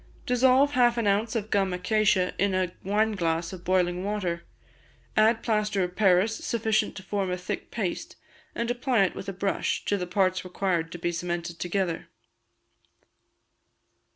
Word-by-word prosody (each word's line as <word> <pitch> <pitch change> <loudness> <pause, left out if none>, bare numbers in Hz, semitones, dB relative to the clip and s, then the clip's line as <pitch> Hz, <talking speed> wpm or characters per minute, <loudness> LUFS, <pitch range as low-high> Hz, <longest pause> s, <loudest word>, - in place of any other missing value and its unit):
Dissolve 260 +3 +4
half 240 -3 +3
an 230 - 0
ounce 205 +3 +1
of 215 -1 -3
gum 195 -2 +2
acacia, 190 0 +2
in 195 -1 +2
a 185 -1 0
wineglass 190 -5 0
of 180 -2 -9
boiling 180 -1 +1
water; 185 -5 -2 0.7
add 220 +1 +4
plaster 210 -3 +1
of 180 0 -4
Paris 200 +2 +3
sufficient 220 -2 0
to 190 - -8
form 195 -1 -2
a 180 - -1
thick 180 - -5
paste, 235 - -4 0.4
and 235 +1 -1
apply 245 -3 +2
it 190 - 0
with 195 - -6
a - - -2
brush, 195 +1 -1
to 205 - +1
the 180 -2 -4
parts 185 0 +1
required 180 -3 -1
to 175 - -6
be 175 0 -1
cemented 170 0 -4
together. 180 -2 -2
195 Hz, 155 wpm, -27 LUFS, 180-220 Hz, 0.7 s, Dissolve